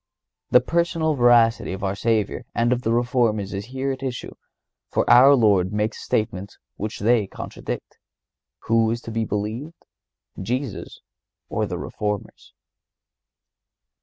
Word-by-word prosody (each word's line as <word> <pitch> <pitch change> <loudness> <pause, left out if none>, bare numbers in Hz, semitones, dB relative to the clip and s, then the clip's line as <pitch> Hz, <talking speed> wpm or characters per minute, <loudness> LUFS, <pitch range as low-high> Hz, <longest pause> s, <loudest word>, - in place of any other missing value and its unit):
The - - +6
personal 165 -2 0
veracity 120 -6 +4
of 95 +1 -7
our 95 0 0
Savior 110 -1 0
and 120 +1 +2
of 125 - -2
the 115 - -1
Reformers 115 -4 +1
is 100 +1 -4
here 135 +2 -3
at 135 0 -6
issue, 130 -3 -5 0.6
for - - 0
our 135 +3 +8
Lord 100 -6 +3
makes 105 +1 -2
a - - -9
statement 100 -3 -2 0.2
which 105 0 -5
they 110 -1 +3
contradict. - - -7 0.6
Who 115 0 +2
is 115 +1 -1
to 115 - -8
be 115 0 -1
believed, 110 +11 -5 0.6
Jesus 125 +1 -4 0.5
or - - -1
the - - -4
Reformers? 105 -1 -5
115 Hz, 135 wpm, -23 LUFS, 105-125 Hz, 0.6 s, our